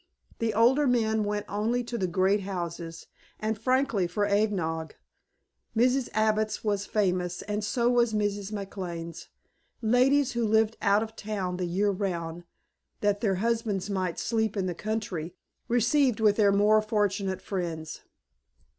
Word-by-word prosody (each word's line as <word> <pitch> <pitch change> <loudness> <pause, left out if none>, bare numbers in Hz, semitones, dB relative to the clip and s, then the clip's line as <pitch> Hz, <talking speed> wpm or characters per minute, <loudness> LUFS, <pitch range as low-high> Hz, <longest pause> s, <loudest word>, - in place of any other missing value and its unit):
The 230 -1 0
older 260 +6 +4
men 220 -3 +2
went 205 0 -2
only 225 +5 0
to 240 0 -6
the 190 -5 0
great 190 +3 +2
houses, 170 -3 -5 0.3
and 220 +1 -1
frankly 230 -4 +1
for 205 +4 0
eggnog. 195 -6 0 0.8
Mrs. 255 +2 +3
Abbott's 215 0 +1
was 205 -2 -1
famous 180 -4 0
and 210 0 -3
so 235 +3 +1
was 240 -1 +3
Mrs. 205 -1 -1
McLane's. 180 -5 -6 0.5
Ladies 250 +4 +3
who 235 -1 -1
lived 220 0 +2
out 205 +1 +3
of 220 0 -8
town 195 -5 -3
the 180 -1 -2
year 200 +4 +1
round, 175 -4 -3 0.6
that 205 0 +1
their 195 -4 +1
husbands 210 -2 -1
might 185 -3 -1
"sleep 220 -2 -1
in 190 - 0
the 180 - -1
country!" 190 -5 -4 0.3
received 245 +1 +2
with 210 -2 +4
their 205 -2 +5
more 210 +2 +4
fortunate 205 -3 0
friends. 165 -5 -4
205 Hz, 145 wpm, -28 LUFS, 185-225 Hz, 0.8 s, their